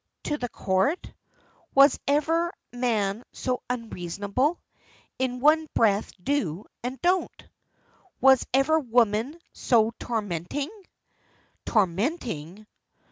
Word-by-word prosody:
"To 295 - -1
the 245 - -3
Court? 195 - 0 0.6
Was 275 0 +6
ever 325 +4 +2 0.2
man 225 -4 0
so 250 -1 -2
unreasonable? 225 - -2 0.6
In 250 -1 -1
one 310 +2 +4
breath 210 -2 +3
'do' 190 - -1 0.2
and 255 +2 -4
'don't'!" 365 +1 0 0.7
"Was 265 -1 +6
ever 275 +5 +3
woman 240 +2 +1
so 225 -2 +2
tormenting?" 220 - -3 1.0
"Tormenting? 205 - -1
245 Hz, 90 wpm, -26 LUFS, 205-285 Hz, 1.0 s, Was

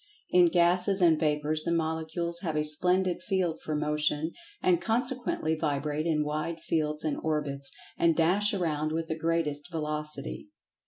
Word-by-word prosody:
In 180 -1 +6
gases 180 +3 +3
and 165 -4 +4
vapors 150 0 +1
the 170 - -1
Molecules 165 +1 -1
have 165 -4 -3
a 150 - +1
splendid 180 +4 +2
field 180 -4 -1
for 155 - -3
Motion, 150 +1 0 0.3
and 175 -2 +2
consequently 240 -8 0
vibrate 150 0 -1
in 155 -2 +1
wide 155 +2 -3
fields 155 -1 -1
and 155 -2 -1
orbits, 145 -3 -2 0.3
and 165 -1 +4
dash 185 +6 +3
around 155 -5 -1
with 165 0 -1
the 160 - -1
greatest 160 -2 -1
velocity. 150 - -3
160 Hz, 150 wpm, -28 LUFS, 150-175 Hz, 0.3 s, In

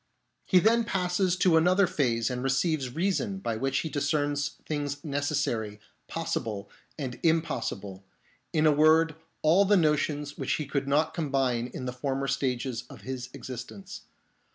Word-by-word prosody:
He 185 - +5
then 225 +5 +4
passes 185 -3 +1
to 180 -3 +4
another 180 +4 +4
phase 125 -7 0
and 125 0 -3
receives 135 0 0
reason, 195 +3 0
by 115 -12 -2
which 135 +4 -1
he - - -3
discerns 145 0 0
things 145 -2 -3
necessary, 140 -8 -1 0.3
possible, 110 -11 -3 0.3
and 125 -5 -5
impossible; 115 - -1 0.5
in 155 0 +2
a 155 - +6
word, 155 +2 +5 0.3
all 165 +6 +5
the 200 +1 +4
notions 150 -2 0
which - - 0
he 150 - -2
could 140 0 -2
not 145 +3 +2
combine 135 -6 0
in 125 +1 -7
the 125 - -3
former 135 +1 -2
stages 125 -3 -1
of - - -12
his 130 -1 -5
existence. 130 - -8
145 Hz, 150 wpm, -28 LUFS, 125-165 Hz, 0.5 s, a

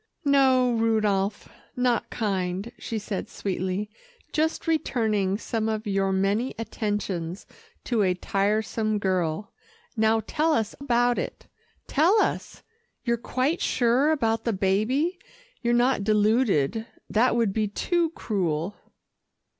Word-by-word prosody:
"No, 260 -3 +4
Rudolph, 215 -3 +1 0.3
not 250 -2 +1
kind," 195 -1 -2
she 225 - -4
said 205 -2 -4
sweetly. 190 +1 -3 0.5
"Just 315 +1 0
returning 220 - +1
some 220 0 -2
of 215 0 -2
your 195 -1 +1
many 200 +6 0
attentions 205 -6 -3 0.4
to 235 -4 0
a 185 -2 +2
tiresome 210 +3 0
girl. 185 -2 -1 0.4
Now, 220 0 +3
tell 315 +6 +1
us 220 -7 0
about 245 -3 +2
it - - -5 0.4
tell 350 +9 +3
us. - - -2 0.4
You're 235 -1 +1
quite 260 +7 -1
sure 250 +4 +2
about 225 -7 +1
the 230 - 0
baby, 220 - +1 0.4
you're 240 -2 +1
not 240 -2 +3
deluded 215 - +2 0.2
that 235 +3 +2
would 230 -5 +1
be 215 0 +1
too 335 - 0
cruel." 180 -3 -1
220 Hz, 120 wpm, -26 LUFS, 195-245 Hz, 0.5 s, No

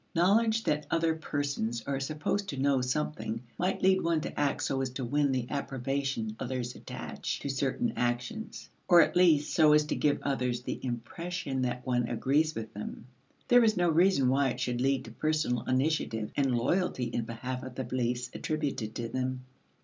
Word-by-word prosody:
Knowledge 220 +6 +3
that 150 0 0
other 165 -1 +2
persons 140 -7 -2
are 140 -1 -1
supposed 155 +8 -2
to 140 - -4
know 135 -1 +2
something 125 -3 -2 0.2
might 185 +2 0
lead 190 0 +5
one 165 -1 +1
to - - -5
act 145 -1 +1
so 135 -1 0
as 130 - -1
to 130 0 -4
win 145 +3 +2
the 130 -2 0
approbation 135 -4 -2
others 125 -1 -3
attach - - -5
to 140 - -3
certain 140 - 0
actions, 120 - -3 0.2
or 175 -2 +8
at - - +1
least 165 -5 +4
so 155 -2 +6
as 150 0 +5
to - - -2
give 145 -1 +2
others 125 -3 -1
the - - -5
impression 135 +4 -3
that 125 0 -2
one 125 -2 +1
agrees 145 +7 +1
with 110 -1 -6
them; 105 +2 -7 0.4
there 245 -1 +6
is 215 -1 +3
no 175 -1 +3
reason 165 -4 +4
why 135 +1 +3
it - - -4
should 125 -1 -1
lead 135 0 +1
to 115 - -9
personal 155 -3 0
initiative 130 -5 0
and 135 -4 +2
loyalty 170 +2 0
in 120 0 -2
behalf 125 +3 -5
of 130 -1 -8
the 130 - -3
beliefs 125 0 -2
attributed 140 -8 -3
to 120 - -3
them. 130 +1 -3
135 Hz, 185 wpm, -30 LUFS, 125-155 Hz, 0.4 s, or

